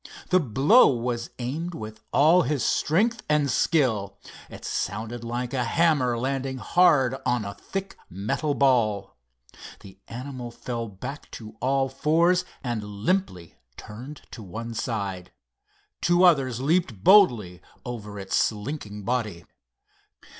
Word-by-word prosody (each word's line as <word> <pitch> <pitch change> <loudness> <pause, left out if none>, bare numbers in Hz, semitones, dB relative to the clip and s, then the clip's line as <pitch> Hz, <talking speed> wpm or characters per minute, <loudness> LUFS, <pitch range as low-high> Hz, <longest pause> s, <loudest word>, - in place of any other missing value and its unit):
The 185 - +5
blow 145 - +5
was 120 -2 -2
aimed 155 +8 -4
with 110 -2 -8
all 165 +5 +5
his 140 0 -1
strength 220 +9 +1
and 150 -2 +2
skill. 120 -11 +1 0.3
It - - -10
sounded 115 +2 -3
like 120 +2 -4
a 130 -2 0
hammer 135 -3 +2
landing 130 +1 -2
hard 135 -1 +3
on 120 -4 0
a 100 - -5
thick 195 - -6
metal 135 - -2
ball. 110 -8 +2 0.7
The 95 0 -14
animal 125 0 -7
fell 115 0 -5
back 125 +8 -8
to 110 -1 -11
all 135 +1 +1
fours 165 +7 +2 0.2
and 120 -4 -2
limply 105 - -2 0.2
turned 125 +8 -10
to 115 - -9
one 115 +4 -7
side. 100 -6 -4 0.7
Two 175 +1 +3
others 135 -9 +4
leaped 140 - 0
boldly 115 - +5 0.2
over 105 -4 -6
its 95 -1 -3
slinking 105 -2 -2
body. 110 -8 -2
125 Hz, 125 wpm, -25 LUFS, 110-150 Hz, 0.7 s, The